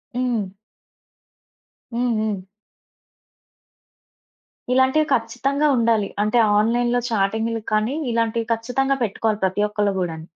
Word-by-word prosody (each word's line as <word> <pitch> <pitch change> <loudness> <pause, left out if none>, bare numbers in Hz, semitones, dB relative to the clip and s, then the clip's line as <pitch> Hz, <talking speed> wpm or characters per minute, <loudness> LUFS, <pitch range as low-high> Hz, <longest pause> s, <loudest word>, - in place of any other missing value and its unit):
హ్మ్. 235 -6 -1 1.4
హ్మ్. 240 +1 0
హ్మ్. 210 -3 -2 2.3
ఇలాంటివి 260 +4 +3
ఖచ్చితంగా 270 +5 0
ఉండాలి. 225 -3 +2
అంటే, 215 +3 +1 0.2
ఆన్‌లైన్‌లో 240 +2 +1
చాటింగ్గులక్కానీ 220 +2 0 0.2
ఇలాంటివి 230 0 0
ఖచ్చితంగా 255 +4 -1
పెట్టుకోవాలి 215 0 -1
ప్రతి 190 +2 +1
ఒక్కళ్ళు 210 -1 0
గూడాను. 165 -3 -4
225 Hz, 85 wpm, -22 LUFS, 210-245 Hz, 2.3 s, ఇలాంటివి